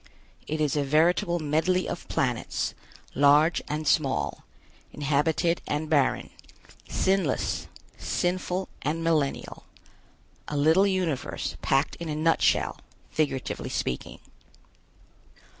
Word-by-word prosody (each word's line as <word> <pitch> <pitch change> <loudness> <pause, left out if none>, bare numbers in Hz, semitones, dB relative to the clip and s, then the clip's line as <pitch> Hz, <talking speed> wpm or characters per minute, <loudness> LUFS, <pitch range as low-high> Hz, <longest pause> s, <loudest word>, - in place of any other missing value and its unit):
It 155 +1 -2
is 150 -2 +1
a 145 - +1
veritable 165 +4 +2
medley 165 +4 +1
of 175 - -5
planets, 125 -4 -1 0.4
large 145 +4 +4
and 150 +1 -3
small, 140 -3 +1 0.5
inhabited 150 +4 +1
and 150 +1 -2
barren, 140 -4 +2 0.6
sinless, 190 -8 0 0.3
sinful 180 +1 -1
and 160 +4 -2
millennial. 155 -4 -1 0.8
A 150 - -3
little 160 +7 +5
universe 180 -8 -2
packed 135 +2 +1
in 170 -1 -6
a 150 - -2
nutshell, 165 +2 +2 0.3
figuratively 145 -4 -2
speaking. 60 - -3
155 Hz, 100 wpm, -27 LUFS, 145-170 Hz, 0.8 s, little